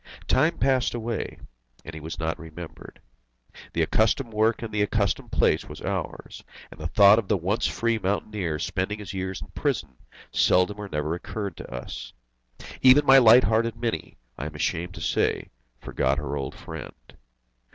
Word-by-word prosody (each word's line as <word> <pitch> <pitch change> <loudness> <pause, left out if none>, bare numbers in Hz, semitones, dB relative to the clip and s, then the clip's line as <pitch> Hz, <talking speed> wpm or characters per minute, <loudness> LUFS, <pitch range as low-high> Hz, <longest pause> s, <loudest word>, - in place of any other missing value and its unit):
Time - - +3
passed 130 0 +2
away, 115 0 -4 0.5
and 80 - -8
he 80 - -7
was 80 +2 -7
not 80 -1 -2
remembered. 80 0 -10 0.7
The - - +2
accustomed 115 +2 +1
work 110 +2 +2
in 115 - -5
the 105 -1 0
accustomed 105 -1 0
place - - +2
was - - -10
ours, - - -5 0.3
and - - -13
the 80 - -3
thought 100 +4 +7
of 110 - -5
the 105 - +2
once 95 +6 0
free 115 -1 0
mountaineer 95 -3 -2
spending 95 +6 -2
his 105 -2 -8
years 95 0 -4
in - - -14
prison 60 - -2 0.3
seldom 90 +3 +3
or 105 -1 -6
never 75 0 -2
occurred 100 +1 -5
to - - -9
us. 60 0 -7 0.7
Even 130 +3 +7
my 135 0 +8
light 120 +1 +8
hearted 115 +1 +1
Mini, 115 0 -4 0.2
I 70 - -3
am 75 - -9
ashamed 85 +5 -2
to 85 - -8
say, - - 0 0.3
forgot 65 +1 0
her 70 -1 -3
old 70 -2 -4
friend. - - -8
100 Hz, 170 wpm, -25 LUFS, 80-110 Hz, 0.7 s, my